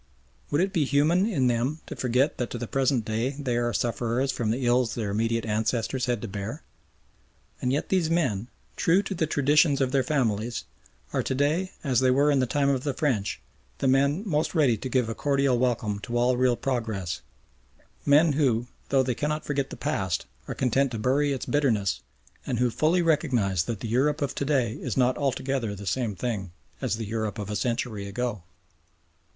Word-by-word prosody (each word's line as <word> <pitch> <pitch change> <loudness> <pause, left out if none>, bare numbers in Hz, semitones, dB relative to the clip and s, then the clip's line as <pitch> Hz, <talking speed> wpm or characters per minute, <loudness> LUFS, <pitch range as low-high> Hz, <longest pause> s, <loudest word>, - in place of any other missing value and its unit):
Would 145 +3 +2
it 190 +1 0
be 160 - +2
human 155 +8 +3
in 150 - +1
them 125 +5 0
to - - -7
forget 130 +4 +1
that 125 - -1
to - - -5
the 120 - -4
present 130 -2 +1
day 115 +5 -1
they 130 -5 -1
are 120 0 +1
sufferers 120 +3 0
from 115 -4 -2
the 125 +3 -1
ills 120 -1 +2
their 105 -4 -2
immediate 115 +2 0
ancestors 115 +4 -1
had 120 -3 -1
to - - -3
bear? 105 +9 -5 1.0
And 125 - 0
yet 140 - -1
these 180 -4 +2
men, 125 - 0 0.3
true 180 +5 +3
to 195 - -4
the 165 -3 0
traditions 145 0 +3
of 130 -2 +1
their 135 -1 +3
families, 120 -4 -1 0.5
are - - +2
to 130 - -2
day 155 +7 0
as 130 -5 +2
they 130 0 +3
were 140 +3 +4
in 140 - +3
the 130 - +1
time 140 +2 +1
of 135 -2 0
the 140 -3 -2
French, 125 - 0 0.4
the - - 0
men 140 +7 +3
most 155 0 0
ready 140 -7 +4
to 130 +5 -5
give 125 -2 +1
a 115 - -2
cordial 140 -1 +1
welcome 115 -5 0
to 120 +3 -3
all 125 +1 +3
real 125 0 +3
progress 110 - -2 0.8
men 150 +2 +5
who, 125 -5 +2 0.2
though 135 -1 +4
they 125 -1 0
cannot 150 +5 -2
forget 140 -2 -1
the - - -8
past, 95 - -1 0.2
are - - -4
content 135 +2 +2
to - - -2
bury 135 +6 +2
its 135 - -3
bitterness 110 - +1 0.5
and 120 - -1
who 125 0 +2
fully 165 +8 +2
recognise 125 - +1
that 115 -4 -4
the - - -3
Europe 145 +6 +1
of 140 - -2
to 140 - -2
day 130 -6 +1
is 125 0 -4
not 125 0 +3
altogether 130 -5 -1
the 100 +1 -9
same 110 0 -1
thing 100 -4 -3 0.3
as - - 0
the 115 - -4
Europe 110 0 -3
of 105 -1 -5
a - - -2
century 115 -3 -2
ago. 105 0 -3
130 Hz, 200 wpm, -26 LUFS, 115-145 Hz, 1.0 s, men